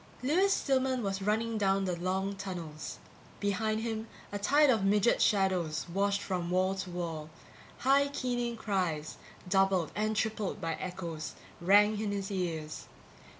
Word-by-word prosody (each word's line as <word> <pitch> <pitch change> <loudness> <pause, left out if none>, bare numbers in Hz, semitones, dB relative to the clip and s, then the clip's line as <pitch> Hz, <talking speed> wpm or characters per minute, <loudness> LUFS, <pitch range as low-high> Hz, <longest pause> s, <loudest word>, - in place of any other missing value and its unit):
Lewis 360 +9 +3
Stillman 260 - +1
was 195 -1 -2
running 220 +2 0
down 195 -1 +2
the 180 -2 -1
long 190 +3 -1
tunnels. 175 -6 -6 0.4
Behind 215 +2 0
him 225 -1 -3 0.2
a 205 - -3
tide 285 +7 +5
of 220 -5 +2
midget 205 +3 +3
shadows 185 -6 +2
washed 200 +1 +1
from 180 -3 -2
wall 185 +1 +2
to 190 -1 -5
wall; 165 -3 -4 0.5
high 275 +2 +4
keening 245 -4 -2
cries, 180 -8 -1 0.3
doubled 190 -2 +2
and 215 +1 0
tripled 215 -2 -1
by 165 0 -2
echoes, 170 -3 -5 0.3
rang 205 +4 +5
in 210 -2 -1
his 200 0 -3
ears. 165 -5 -3
195 Hz, 145 wpm, -31 LUFS, 180-220 Hz, 0.5 s, tide